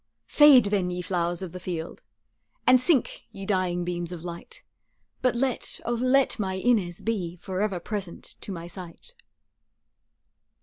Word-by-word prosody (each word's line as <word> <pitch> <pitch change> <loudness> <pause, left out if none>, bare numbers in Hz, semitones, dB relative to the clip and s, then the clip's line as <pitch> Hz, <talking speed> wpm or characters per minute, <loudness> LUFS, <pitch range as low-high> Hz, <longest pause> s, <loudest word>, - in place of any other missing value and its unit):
Fade 295 -5 +7
then, 190 -3 +1
ye 180 0 -4
flowers 175 0 -1
of 180 - -6
the 180 - -7
field, 170 -2 -5 0.6
And 255 0 +6
sink, 280 -2 +1
ye 195 - -8
dying 185 -3 0
beams 175 -1 -3
of 170 -2 -7
light, 170 -1 -7 0.6
But 255 -1 +2
let, 255 0 0
O 240 - 0
let 255 +1 +2
my 190 -2 -1
Inez 190 -4 +1
be 185 -7 -2
Forever 190 +1 -2
present 195 -1 -5 0.2
to - - -5
my 170 -2 -6
sight. 180 - -10
190 Hz, 145 wpm, -26 LUFS, 175-235 Hz, 0.6 s, Fade